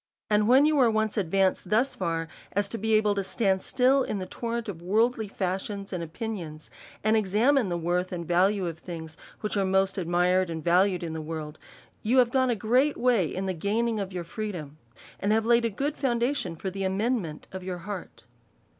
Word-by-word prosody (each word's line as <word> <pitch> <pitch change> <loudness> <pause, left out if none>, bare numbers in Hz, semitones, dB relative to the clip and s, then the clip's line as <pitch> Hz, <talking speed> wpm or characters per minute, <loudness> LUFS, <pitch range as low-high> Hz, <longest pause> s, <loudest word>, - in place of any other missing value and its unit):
And 210 0 +3
when 265 +4 +6
you 305 -1 +3
are 245 -3 +5
once 220 -1 0
advanced 190 -1 +1
thus 235 +6 +2
far, 165 -3 -2 0.3
as 205 0 +1
to 230 - -5
be 220 +1 +2
able 215 -1 +3
to 200 -1 -1
stand 190 -2 0
still 265 +1 +3
in 215 - -2
the 185 - -4
torrent 235 +3 -4
of 175 -5 -6
worldly 220 +4 +1
fashions 195 +1 -3
and 175 -2 -2
opinions, 165 -4 -6 0.3
and 215 +1 +3
examine 220 +4 +3
the 175 - -1
worth 175 +2 -1
and 170 -2 -5
value 190 +2 +2
of 165 -1 -6
tilings 160 -3 -7 0.3
which 210 -1 -2
arc 195 -2 +1
most 190 +1 +1
admired 180 +1 +2
and 160 -1 -5
valued 180 +1 +3
in 165 -1 -4
the 160 - -4
world, 155 -1 -6 0.4
you 240 +5 +1
have 245 -2 +5
gone 260 -1 +2
a 240 - +2
great 250 +8 +2
way 235 -8 +3
in 190 +5 -4
the 190 - -1
gaining 215 +6 0
of 195 -1 -4
your 180 -2 -4
freedom, 170 -6 -6 0.4
and 200 - 0
have 220 0 +2
laid 235 0 +4
a - - +2
good 280 +8 -2
foundation 240 - 0
for 190 +4 -4
the 195 +1 -4
amendment 190 -4 -1
of 190 - -6
your 180 -1 -4
heart. 200 -3 -7
195 Hz, 205 wpm, -27 LUFS, 180-225 Hz, 0.4 s, when